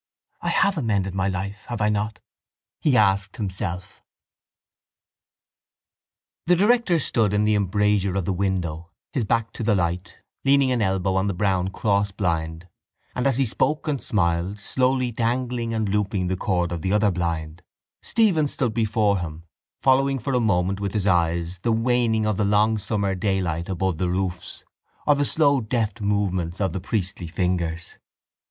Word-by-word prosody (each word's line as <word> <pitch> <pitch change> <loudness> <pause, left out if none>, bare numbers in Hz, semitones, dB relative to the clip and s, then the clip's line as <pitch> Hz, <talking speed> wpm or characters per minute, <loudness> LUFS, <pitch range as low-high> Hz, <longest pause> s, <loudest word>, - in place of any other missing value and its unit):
—I - - -1
have 195 -4 +2
amended 100 -7 0
my 95 0 0
life, 100 +2 -4
have 120 -2 -4
I 105 0 +2
not? 105 -1 -2 0.6
he 140 -5 +3
asked 95 -1 +2
himself. 95 -3 -4 2.5
The 180 - +5
director 205 -1 +3
stood 110 -9 +1
in 105 +1 +2
the 105 0 +3
embrasure 100 -1 +1
of 95 -3 -1
the 95 - 0
window, 90 -4 -2 0.2
his 130 -6 0
back 115 +1 0
to - - -7
the 105 -1 +3
light, 90 +2 -2 0.3
leaning 135 -1 +4
an 125 -2 +1
elbow 95 -2 +1
on 95 +1 +1
the 100 - -1
brown 95 -1 +1
crossblind, 95 -5 -1 0.5
and, 125 +2 0
as 135 -3 +1
he 135 - +2
spoke 135 +6 0
and 145 -4 -1
smiled, 90 -2 0
slowly 130 +4 0
dangling 120 0 -1
and 110 -2 -1
looping 100 -2 0
the 95 - 0
cord 90 -2 -1
of 85 -2 -3
the 95 - -1
other 105 0 +3
blind, 85 -2 -3 0.4
Stephen 190 -10 +2
stood 125 -5 -2
before 105 -3 +1
him, 80 -1 -6 0.4
following 135 +1 +3
for 135 +2 -3
a 125 - +3
moment 95 -4 +1
with 100 -2 -3
his 105 -3 0
eyes 85 -1 +1
the 115 - 0
waning 115 -1 +1
of 105 -2 0
the 105 - +1
long 105 +2 +3
summer 100 -1 -1
daylight 90 -3 -1
above 95 -3 -1
the 90 - 0
roofs 90 -1 -3 0.4
or 150 - +5
the 145 0 +1
slow 140 -3 +3
deft 115 0 -2
movements 95 -4 -1
of 95 -4 0
the 95 - -3
priestly 95 -3 -3
fingers. 85 -1 -2
100 Hz, 165 wpm, -24 LUFS, 90-115 Hz, 2.5 s, The